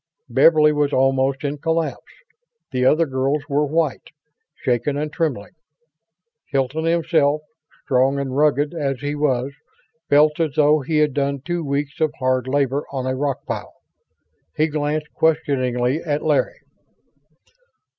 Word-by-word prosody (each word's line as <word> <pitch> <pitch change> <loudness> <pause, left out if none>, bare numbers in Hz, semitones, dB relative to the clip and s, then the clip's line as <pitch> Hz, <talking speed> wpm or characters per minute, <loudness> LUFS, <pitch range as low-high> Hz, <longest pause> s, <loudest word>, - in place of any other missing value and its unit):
Beverly 155 -2 +5
was 145 -1 +1
almost 135 +1 +1
in 145 0 -3
collapse. 165 +1 -2 0.6
The 125 -1 0
other 155 +5 +4
girls 135 +1 -1
were 145 0 +1
white, 155 -2 -1 0.5
shaken 125 +3 -1
and 150 +1 -3
trembling. 145 - -2 1.0
Hilton 135 +4 -1
himself, 160 -3 +2 0.4
strong 130 +1 +2
and 135 -2 -3
rugged 145 +1 +2
as 140 -5 -2
he 145 0 -2
was, 140 -2 0 0.6
felt 150 +2 +4
as 155 -5 -1
though 150 0 +4
he 155 +3 -2
had 150 -2 +2
done 140 -1 -1
two 175 +3 -3
weeks 145 +1 -3
of 155 -2 +1
hard 130 -1 0
labor 140 +1 0
on 130 -2 -3
a 130 0 -1
rock 140 0 -2
pile. - - -5 0.8
He 155 - +3
glanced 150 +1 -2
questioningly 135 -4 0
at 150 -2 -2
Larry. - - 0
145 Hz, 135 wpm, -21 LUFS, 135-155 Hz, 1.0 s, Beverly